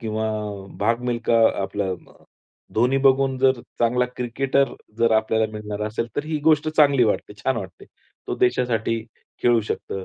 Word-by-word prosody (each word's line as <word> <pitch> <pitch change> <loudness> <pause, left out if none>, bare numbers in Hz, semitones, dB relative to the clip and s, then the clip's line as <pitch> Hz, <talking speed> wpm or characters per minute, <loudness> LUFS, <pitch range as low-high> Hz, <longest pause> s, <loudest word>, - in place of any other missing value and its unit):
किंवा 110 -1 -2 0.5
भाग 115 +3 +1
मिल्खा 120 -1 0 0.3
आपला 100 +1 -2
अ, 90 - -10 0.5
धोनी 125 +4 +2
बघून 135 0 +4
जर 130 -2 +3 0.2
चांगला 120 +1 +2
क्रिकेटर 135 +3 0 0.3
जर 115 -1 +3
आपल्याला 110 0 +1
मिळणार 105 -1 -5
असेल, 110 +2 -3
तर 145 - -1
ही 155 -1 -2
गोष्ट 155 -1 +4
चांगली 145 -5 +4
वाटते, 105 -1 -1
छान 130 -2 +1
वाटते. 95 -4 -7 0.4
तो - - -2
देशासाठी 115 -2 +1 0.4
खेळू 120 -1 +4
शकतं. 95 -2 -5
120 Hz, 150 wpm, -23 LUFS, 110-135 Hz, 0.5 s, बघून